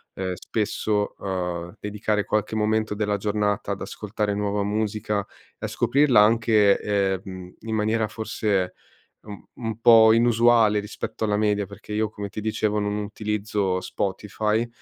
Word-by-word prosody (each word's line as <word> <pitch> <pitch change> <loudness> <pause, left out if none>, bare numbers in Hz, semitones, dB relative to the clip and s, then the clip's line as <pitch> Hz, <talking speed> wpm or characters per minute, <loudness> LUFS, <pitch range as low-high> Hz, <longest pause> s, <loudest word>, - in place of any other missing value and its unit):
ehm, 95 -1 -3
spesso, 105 +1 -1
uhm, 90 -1 -4
dedicare 105 0 -1
qualche 105 +1 -1
momento 110 0 0
della 105 -1 0
giornata 105 0 -1
ad 100 - -8
ascoltare 105 0 -3
nuova 105 0 -1
musica 105 0 -1 0.4
e - - -4
a - - -1
scoprirla 130 0 +3
anche, 110 -2 +4
ehm, 95 -2 0
mhmm, 95 -1 -9
in 110 0 -4
maniera 110 +1 +1
forse 105 -4 -1 0.5
un 105 -1 -10
un 115 -2 -5
po' 115 -2 +7
inusuale 115 -2 +4
rispetto 105 +1 -4
alla 105 -1 +1
media, 105 -2 +1
perché 100 +1 -10
io, 110 0 0
come 105 -2 -6
ti 105 - -6
dicevo, 105 0 0
non 105 0 -1
utilizzo 105 -2 -2
Spotify 105 +4 -2
105 Hz, 145 wpm, -24 LUFS, 100-110 Hz, 0.5 s, po